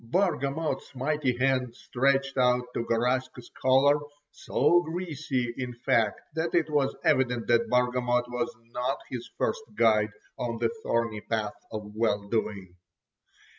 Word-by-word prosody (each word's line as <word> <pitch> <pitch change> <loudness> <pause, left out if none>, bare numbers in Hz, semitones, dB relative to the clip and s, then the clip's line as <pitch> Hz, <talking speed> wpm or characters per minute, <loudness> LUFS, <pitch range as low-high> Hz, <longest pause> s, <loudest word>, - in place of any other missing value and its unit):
Bargamot's 150 0 -1
mighty 135 -1 0
hand 130 -2 +1
stretched 135 +2 +1
out 125 -1 +3
to - - -1
Garaska's 125 +1 -1
collar, 135 +3 +5 0.3
so 175 0 +3
greasy 155 -8 -3
in 125 -2 -4
fact 115 -3 +1
that 160 +1 -1
it 160 -3 +2
was 140 -2 +1
evident 125 -6 +2
that 115 0 +3
Bargamot 125 0 +2
was 160 +7 -2 0.2
not 125 +1 -1
his - - -5
first 485 - 0
guide 110 - +4 0.3
on 115 -1 -2
the - - +1
thorny 115 - -1
path 110 -2 -2 0.2
of 105 -1 -6
well 105 -2 0
doing. 100 -5 -2
125 Hz, 135 wpm, -28 LUFS, 115-140 Hz, 0.3 s, collar